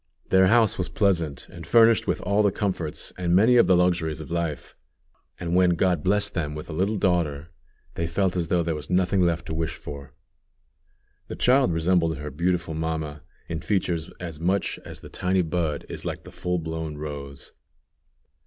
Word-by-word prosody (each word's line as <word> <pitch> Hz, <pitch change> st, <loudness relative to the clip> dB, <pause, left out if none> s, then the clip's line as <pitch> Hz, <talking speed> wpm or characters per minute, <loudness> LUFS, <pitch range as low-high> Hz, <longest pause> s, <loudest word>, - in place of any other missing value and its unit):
Their 95 Hz, 0 st, +5 dB
house 110 Hz, -1 st, +4 dB
was 90 Hz, -1 st, -1 dB
pleasant, 85 Hz, -, 0 dB
and -, -, -10 dB
furnished 115 Hz, -1 st, +5 dB
with -, -, 0 dB
all 100 Hz, +3 st, +2 dB
the 100 Hz, -2 st, +3 dB
comforts 95 Hz, -7 st, -3 dB
and 90 Hz, -1 st, +2 dB
many 110 Hz, +6 st, +5 dB
of 120 Hz, -, +6 dB
the 90 Hz, -, +5 dB
luxuries 85 Hz, -3 st, +1 dB
of 80 Hz, -, -9 dB
life; 85 Hz, -3 st, -3 dB, 0.6 s
and 85 Hz, -1 st, -3 dB
when 90 Hz, -1 st, +4 dB
God 90 Hz, -3 st, +1 dB
blessed 100 Hz, +2 st, +1 dB
them 75 Hz, -4 st, -2 dB
with 75 Hz, +2 st, -7 dB
a -, -, -5 dB
little 95 Hz, +7 st, 0 dB
daughter, 85 Hz, -5 st, 0 dB, 0.4 s
they 85 Hz, -, -2 dB
felt 95 Hz, +2 st, 0 dB
as 85 Hz, -2 st, -1 dB
though 85 Hz, 0 st, +1 dB
there 85 Hz, 0 st, -1 dB
was 75 Hz, -1 st, -7 dB
nothing 90 Hz, +1 st, +2 dB
left 85 Hz, -1 st, +1 dB
to 80 Hz, -, -5 dB
wish 80 Hz, 0 st, -2 dB
for. 70 Hz, -1 st, -9 dB, 1.1 s
The -, -, -6 dB
child 130 Hz, -5 st, +3 dB
resembled 80 Hz, -1 st, +1 dB
her 75 Hz, 0 st, -6 dB
beautiful 85 Hz, +2 st, -1 dB
mamma 80 Hz, -2 st, -3 dB, 0.3 s
in 80 Hz, -1 st, -4 dB
features 85 Hz, -3 st, -1 dB
as 85 Hz, -4 st, -7 dB
much 95 Hz, +4 st, 0 dB
as -, -, -9 dB
the -, -, -11 dB
tiny 90 Hz, 0 st, 0 dB
bud 80 Hz, -3 st, -2 dB
is -, -, -6 dB
like -, -, -5 dB
the -, -, -12 dB
full 90 Hz, 0 st, -2 dB
blown 80 Hz, -2 st, -4 dB
rose. 70 Hz, -2 st, -7 dB
85 Hz, 185 wpm, -25 LUFS, 80-95 Hz, 1.1 s, of